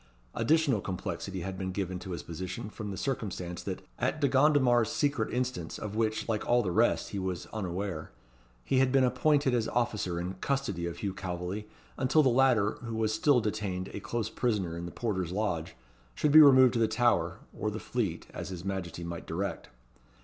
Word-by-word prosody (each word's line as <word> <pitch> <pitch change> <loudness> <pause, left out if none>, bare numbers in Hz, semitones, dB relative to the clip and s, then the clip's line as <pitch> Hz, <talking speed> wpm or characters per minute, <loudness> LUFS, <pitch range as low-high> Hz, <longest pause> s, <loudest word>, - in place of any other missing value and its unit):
Additional 150 -9 +2
complexity 95 0 -4
had 95 +1 -5
been 95 -1 -2
given 95 -1 -3
to 95 - -9
his 85 - -4
position 95 +6 -6
from 105 -1 -6
the 95 - -5
circumstance 95 - -3
that, 95 -2 -5 0.2
at 130 +5 0
De 145 - +3
Gondomar's 130 -5 +4
secret 140 -6 0
instance, 125 -10 -2
of 105 -1 -6
which, 110 -1 0
like 110 -2 -1
all 120 0 +4
the 95 - -1
rest, 110 +6 +2
he 100 - -3
was 95 -2 -3
unaware, 95 -4 -3 0.6
he 130 - +2
had 130 -1 +3
been 135 0 +4
appointed 140 +1 +3
as 115 -2 +1
officer 105 -8 -1
in 90 +2 -3
custody 120 -12 -1
of 85 0 -5
Hugh 100 +1 -3
Calveley, 95 +2 -4 0.3
until 135 +4 +4
the 130 - +4
latter, 120 -5 +3
who 115 -1 -4
was 110 -1 0
still 145 -5 +4
detained 100 -4 -3
a - - -6
close 115 +2 -3
prisoner 100 -9 -1
in 85 +1 -5
the - - -7
porter's 95 -7 -2
lodge, 90 -5 -2 0.4
should 150 - +1
be 155 +1 +10
removed 130 -3 +8
to 120 - 0
the 115 - +4
Tower, 120 +2 +2 0.2
or 105 - -1
the 105 - -4
Fleet, 105 -10 -2
as - - -5
his 90 -1 -7
Majesty 95 -3 -4
might 85 0 -6
direct. 95 +5 -3
105 Hz, 195 wpm, -30 LUFS, 95-125 Hz, 0.6 s, be